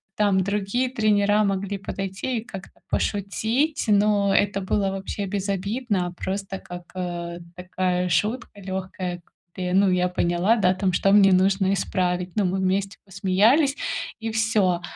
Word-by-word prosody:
там 200 -2 +2
другие 205 +6 -1
тренера 210 -3 +2
могли 200 0 -1
подойти 195 +5 -4
и 220 - -8
как-то 195 -6 -10
пошутить, 220 +9 0
но 205 -1 +3
это 200 -1 +2
было 195 +1 0
вообще 195 +1 -4
безобидно, 200 0 -2
просто 195 0 -4
как, 175 -1 -9
э, 175 -1 -4 0.2
такая 180 0 -1
шутка 210 +8 0
лёгкая, 185 -2 -5 0.3
где, 180 -1 -3
ну, 195 0 +4
я 180 0 +2
поняла, 180 +4 +1
да, 185 -4 +3
там, 190 0 0
что 195 +1 +2
мне 200 -1 +6
нужно 190 +1 +3
исправить. 180 -1 -1
Ну, 210 -2 +2
мы 185 +1 0
вместе 190 +1 -1
посмеялись 215 - +3 0.4
и 225 -1 -3
всё. 215 -6 +1
195 Hz, 140 wpm, -24 LUFS, 185-210 Hz, 0.4 s, мне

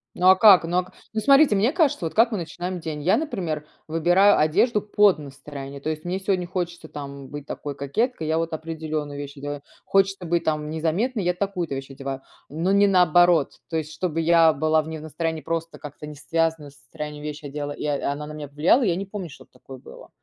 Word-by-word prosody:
Ну 180 - +2
а 190 - +8
как? 195 -3 +7
Ну 175 +2 -1
а 180 - +2
к 185 - -18 0.2
ну 220 - -1
смотрите, 275 -4 +5
мне 220 +7 +2
кажется, 315 - +1
вот 160 - -4
как 230 +2 +4
мы 215 - -1
начинаем 175 +2 -5
день. 155 -3 -5
Я, 185 - +4
например, 170 - -3 0.2
выбираю 175 +6 +4
одежду 205 +9 +2
под 205 -5 +3
настроение, 140 -1 -9
то 155 - -3
есть 155 0 -4
мне 180 +2 -2
сегодня 190 -2 -1
хочется 175 -2 -4
там 140 -2 -8
быть 145 -1 -8
такой 145 -1 -6
кокеткой- 160 - -2
я 160 +1 +1
вот 165 -1 -3
определенную 155 -2 -4
вещь 145 0 -8
одеваю. 145 +1 -5 0.2
Хочется 195 -1 +1
быть 170 0 0
там 150 -2 -1
незаметной- 180 +9 -1
я 180 0 +1
такую-то 180 -5 -3
вещь 135 0 -7
одеваю, 135 0 -6 0.3
но 165 +6 -1
не 200 +1 +5
наоборот. 175 -4 +4 0.2
То 165 - -1
есть 155 -1 -4
чтобы 165 0 -2
я 165 0 +5
была 155 +2 +2
в 155 - -10
не 160 -1 -6
настроении, 160 +1 -3
просто 165 +1 -4
как-то 150 0 -9
не 150 - -9
связанную 160 0 -1
с 140 - -22
настроением 150 +1 -8
вещь 150 0 -6
одела, 145 0 -5
и, - - -7
э, 145 -2 -1
она 145 +1 -2
на 150 - -8
меня 150 -1 -7
повлияла,- 150 - +3
я 180 -6 +2
не 195 - -4
помню, 195 -3 -6
чтоб 140 - -15
такое 135 -1 -12
было. - - -14
160 Hz, 220 wpm, -24 LUFS, 150-185 Hz, 0.3 s, а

